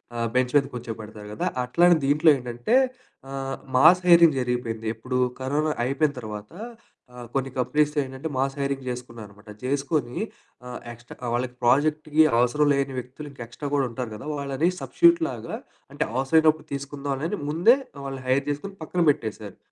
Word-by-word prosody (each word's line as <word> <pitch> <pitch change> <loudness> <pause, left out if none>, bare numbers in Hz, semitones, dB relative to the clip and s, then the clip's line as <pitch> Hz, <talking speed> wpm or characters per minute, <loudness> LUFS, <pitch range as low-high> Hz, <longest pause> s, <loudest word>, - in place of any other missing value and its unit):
ఆహ్, 115 0 -1
బెంచ్ 125 0 +1
మీద 140 - +5
కూర్చోపెడతారు 110 -3 -7
గదా! 105 - -3 0.2
అట్లానే 175 +8 +4
దీంట్లో 150 +3 +4
ఏంటంటే 120 - -1 0.5
ఆహ్, 135 0 -4 0.2
మాస్ 160 +7 +7
హైరింగ్ 170 -4 +7
జరిగిపోయింది. 120 -3 -3
ఎప్పుడు 125 +3 -3 0.2
కరోనా 145 +4 0
అయిపోయిన 140 +4 +1
తర్వాత 105 -2 -8 0.6
ఆహ్, 120 -1 -9
కొన్ని 135 -1 -1
కంపెనీస్ 150 +4 +1
ఏంటంటే 135 +4 -6
మాస్ 135 +1 0
హైరింగ్ 140 -1 -2
జేసుకున్నారనమాట. 115 -4 -9
జేసుకొని 140 0 -1 0.5
ఆహ్, 125 - -6
ఎక్స్‌ట్రా 120 +1 -8
వాళ్ళకి 125 0 -3
ప్రాజెక్ట్‌కి 155 +4 +3 0.2
అవసరం 145 +5 +3
లేని 135 -1 -1
వ్యక్తులు 130 +4 -9
ఇంకా 130 -4 -8
ఎక్స్‌ట్రా 140 +5 -6
గూడా 135 -3 +2
ఉంటారు 120 -1 -5
గదా! 105 - -9
వాళ్ళని 140 +4 0
సబ్‌స్టిట్యూట్ 340 0 +4
లాగా - - -6 0.4
అంటే - - 0
అవసరమైనప్పుడు 155 +4 +3
తీసుకుందాంలే 140 +1 -3
అని 210 - -2
ముందే 180 - +5 0.3
వాళ్ళని 135 -1 -6
హైర్ 135 +2 +2
జేసుకొని 195 +7 -4
పక్కన 175 +3 0
బెట్టేసారు. 110 -5 -6
135 Hz, 150 wpm, -25 LUFS, 120-150 Hz, 0.6 s, మాస్